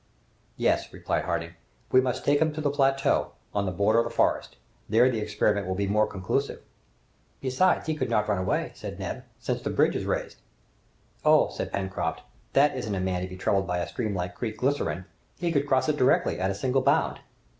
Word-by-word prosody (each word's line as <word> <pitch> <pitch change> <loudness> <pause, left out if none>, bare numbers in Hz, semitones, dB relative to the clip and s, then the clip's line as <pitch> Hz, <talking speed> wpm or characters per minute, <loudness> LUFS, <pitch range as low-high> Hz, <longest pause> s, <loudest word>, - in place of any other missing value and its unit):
"Yes," - - +1
replied - - -2
Harding, - - -2 0.4
"we 130 - +6
must 130 -1 -2
take 145 +1 +3
him 160 0 +3
to 155 - -5
the 145 -2 +1
plateau, 135 -1 +2 0.2
on 100 -1 0
the - - 0
border 100 +5 +3
of 115 - +2
the - - -3
forest. 115 - 0 0.3
There 115 +4 +5
the 115 - -1
experiment 105 -2 0
will 95 - -1
be 100 +1 0
more 105 +2 +2
conclusive." 100 +8 -2 0.8
"Besides, 135 +8 +2
he 160 - 0
could 150 - -2
not 105 -2 +1
run 105 -3 +1
away," 95 - -1
said - - -7
Neb, - - -5
"since - - -3
the - - -3
bridge - - +2
is - - -2
raised." - - -2 0.9
"Oh!" - - +5
said - - -4
Pencroft, 95 -1 -2 0.3
"that 145 +1 +4
isn't 110 -6 -3
a - - -2
man 90 -1 -1
to 90 - -3
be 95 0 -9
troubled 95 0 +1
by 90 -1 -1
a 85 - -2
stream 110 -5 -3
like 90 0 -3
Creek 110 +2 -4
Glycerine! 110 - -1 0.3
He 175 -1 -1
could 145 -2 +1
cross 130 0 +2
it 150 -1 +1
directly, 130 - +3
at 95 +1 +1
a 100 - -2
single 130 +4 +1
bound!" 140 +4 +2
110 Hz, 210 wpm, -27 LUFS, 95-135 Hz, 0.9 s, we